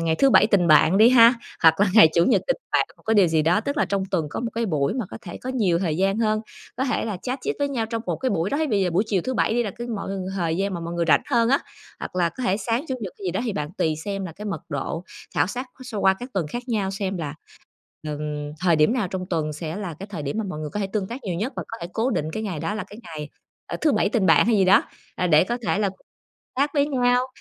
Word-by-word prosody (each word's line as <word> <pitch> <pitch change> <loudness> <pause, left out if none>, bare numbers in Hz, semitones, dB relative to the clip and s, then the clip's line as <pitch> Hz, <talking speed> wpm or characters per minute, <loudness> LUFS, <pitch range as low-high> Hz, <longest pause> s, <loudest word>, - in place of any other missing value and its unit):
ngày 165 -1 +1
thứ 275 -1 +4
bảy 215 - +6
tình 195 -6 +3
bạn 160 +5 +6
đi 225 +2 +8
ha, 235 -1 +7 0.3
hoặc 160 +4 +6
là 205 - +5
ngày 215 -8 +9
chủ 170 0 +4
nhật - - +3
tình - - +1 0.2
bạn - - +3
một - - -24
cái 225 - +2
điều 195 -5 +5
gì 160 -1 +2
đó. 175 +6 +3
Tức 280 +5 -3
là - - +3
trong 195 -1 -1
tuần 165 -5 +1
có - - -4
một 235 - -3
cái 230 0 0
buổi 150 +2 0
mà 250 - -2
có - - -7
thể - - -8
có 255 - -3
nhiều 200 -10 +1
thời 165 -4 -1
gian 195 +3 +1
hơn, 215 -1 +1 0.4
có 260 - 0
thể 250 - -1
là 215 -4 -3
chat 255 +1 -3
chit 435 - -2
với 285 - 0
nhau 240 -5 -2
trong 225 0 -4
một - - -1
cái 260 - -1
buổi 185 0 0
đó, 285 - 0
thế 315 - +1
bây 205 -6 +1
giờ 180 - +1
buổi 180 +5 +2
chiều 195 -5 0
thứ 260 - -2
Bảy 220 - +1
đi 240 - +2
là 210 - -3
cái 240 +5 -7
mọi 200 -4 -4
ng 190 -1 -4
thời 165 -3 0
gian 195 0 -1
mà 170 - -4
mọi 170 +1 -5
người 170 - 0
rảnh - - +5
hơn 235 -2 +3
á, 275 - +4 0.4
hoặc - - -6
là 175 -2 +2
có 255 - -8
thể 190 - +2
sáng 230 +6 -1
Chủ 260 - -1
nhật 195 -5 -5
hay 195 - -6
gì - - +1
đó 190 - -1
thì 225 - -1
bạn 150 -3 -3
tùy 155 -1 +1
xem 195 -1 -3
là 165 - -8
cái 205 +6 -10
mật 205 - -4
độ 155 +3 -4 0.3
khảo - - +3
sát 250 +6 -5 0.2
so 230 -5 -5
qua 190 -1 +4
các 250 +2 -7
tuần 180 -5 0
khác 240 +7 -4
nhau 205 -5 0
xem 195 -1 -3
là, 150 -2 -4 0.7
ừm, 150 0 -4
thời 175 -3 +3
điểm 155 +8 +4
nào 215 -8 -1
trong 185 -1 -4
tuần 155 -3 -1
sẽ 160 +3 -5
là 185 -6 -5
cái 195 - -6
thời 165 -7 -5
điểm 145 +10 -3
mà 220 - -1
mọi 155 -4 -5
người 150 -1 -5
có 210 - -3
thể 195 - 0
tương 195 -1 -3
tác 245 +3 -7
nhiều 185 -4 -2
nhất 225 +9 -2
và - - -2
có 225 - -6
thể 170 - -4
cố 230 +4 0
định 155 - -1
cái 220 - -3
ngày 185 -7 -3
đó 210 - -2
là 210 -3 -4
cái 205 - -11
ngày, 155 -3 -7 0.4
ờ, - - -4
thứ 305 -3 +3
bảy - - +2
tình 215 -4 +1
bạn 165 - +5
hay 225 -2 +3
gì 190 - +4
đó, 190 +2 +6 0.3
à, 180 - 0
để 155 0 +5
có 240 +4 -2
thể - - +1
là 200 -2 +1 0.7
chat 285 +2 +2
với 285 -1 +3
nhau, 250 -2 +2
195 Hz, 310 wpm, -24 LUFS, 170-230 Hz, 0.7 s, ngày